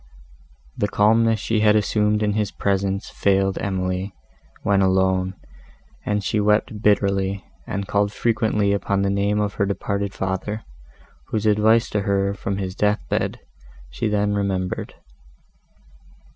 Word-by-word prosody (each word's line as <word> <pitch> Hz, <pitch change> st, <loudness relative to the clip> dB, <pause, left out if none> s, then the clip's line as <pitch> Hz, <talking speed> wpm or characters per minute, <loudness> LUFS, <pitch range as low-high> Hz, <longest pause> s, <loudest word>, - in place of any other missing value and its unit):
The 105 Hz, -, 0 dB
calmness 110 Hz, +2 st, +3 dB
she 110 Hz, +1 st, 0 dB
had 105 Hz, 0 st, +4 dB
assumed 105 Hz, +1 st, +1 dB
in 105 Hz, -1 st, +1 dB
his 105 Hz, -1 st, 0 dB
presence 100 Hz, 0 st, -1 dB
failed 95 Hz, -1 st, +1 dB
Emily, 95 Hz, 0 st, -2 dB, 0.5 s
when 100 Hz, -1 st, +3 dB
alone, 95 Hz, 0 st, +2 dB, 0.7 s
and 105 Hz, -1 st, -1 dB
she 105 Hz, -, 0 dB
wept 105 Hz, 0 st, +1 dB
bitterly, 100 Hz, -2 st, +1 dB, 0.2 s
and 100 Hz, 0 st, -3 dB
called 100 Hz, -1 st, +1 dB
frequently 110 Hz, -3 st, +1 dB
upon 100 Hz, 0 st, 0 dB
the 100 Hz, -, +1 dB
name 100 Hz, +1 st, +1 dB
of 105 Hz, -1 st, -1 dB
her -, -, +4 dB
departed 100 Hz, 0 st, -2 dB
father, 95 Hz, +3 st, -3 dB, 0.6 s
whose 110 Hz, -1 st, -2 dB
advice 110 Hz, +2 st, +4 dB
to 105 Hz, -, 0 dB
her 100 Hz, 0 st, 0 dB
from 100 Hz, 0 st, -3 dB
his 95 Hz, -2 st, -3 dB
death 105 Hz, +2 st, 0 dB
bed -, -, -1 dB, 0.5 s
she 110 Hz, -, -2 dB
then 105 Hz, -1 st, +1 dB
remembered. 95 Hz, -2 st, -2 dB
100 Hz, 135 wpm, -22 LUFS, 95-105 Hz, 0.7 s, had